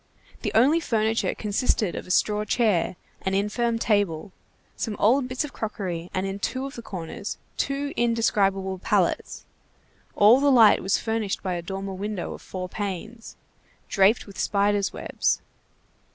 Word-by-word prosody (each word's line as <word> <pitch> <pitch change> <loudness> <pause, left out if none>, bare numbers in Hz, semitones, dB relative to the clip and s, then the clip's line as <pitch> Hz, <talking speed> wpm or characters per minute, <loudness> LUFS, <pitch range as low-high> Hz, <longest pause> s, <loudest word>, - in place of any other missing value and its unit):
The - - -2
only 275 +9 +5
furniture 225 -6 0
consisted 210 -2 0
of - - -6
a - - -12
straw 210 +3 +2
chair, 210 -5 +1 0.3
an 190 0 -1
infirm 230 +4 0
table, 205 -5 0 0.4
some 220 -3 -3
old 250 +5 +3
bits 255 +2 -2
of 295 - -7
crockery, 180 -6 -4
and 190 0 -1
in 195 +1 -4
two 260 +6 -2
of 275 - -6
the 235 - -7
corners, 200 +2 -6 0.2
two 280 +1 -2
indescribable 195 -5 +1
pallets; - - 0 0.7
all 215 +5 +7
the 285 0 +4
light 230 -5 +7
was 190 - +1
furnished 220 -3 -2
by 185 -2 -1
a 175 - -3
dormer 195 +2 -5
window 200 0 -4
of - - -10
four 185 -1 -6
panes, 205 +4 -6 0.5
draped 200 +4 +3
with 195 -3 -11
spiders' 200 0 +1
webs. - - -1
210 Hz, 150 wpm, -25 LUFS, 195-230 Hz, 0.7 s, all